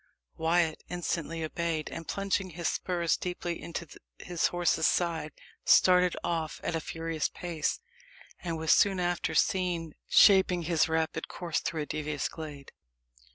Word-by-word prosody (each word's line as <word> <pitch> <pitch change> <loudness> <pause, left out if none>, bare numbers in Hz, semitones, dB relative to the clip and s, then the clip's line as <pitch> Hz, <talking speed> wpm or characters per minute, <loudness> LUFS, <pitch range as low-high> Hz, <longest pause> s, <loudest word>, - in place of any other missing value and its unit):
Wyat 165 -1 +1
instantly 165 -2 -3
obeyed, 160 -1 -2
and 165 - -7
plunging 195 -1 -1
his 170 0 -3
spurs 170 -3 0
deeply 175 -1 -4
into 170 0 -5 0.3
his 175 -2 0
horse's 175 -2 +2
sides, 165 -4 0 0.3
started 180 -1 +5
off 165 -2 -2
at 170 - -1
a 165 - -1
furious 165 -1 -2
pace, 170 -4 -2 0.6
and 170 -2 -3
was 160 0 +1
soon 195 -2 +4
after 175 -1 -1
seen 175 -4 +1 0.2
shaping 190 -3 +6
his 165 -1 +2
rapid 160 0 -1
course 170 -3 -2
through 165 -2 -2
a - - -6
devious 150 -1 -2
glade. 150 -4 -9
170 Hz, 140 wpm, -29 LUFS, 160-175 Hz, 0.6 s, shaping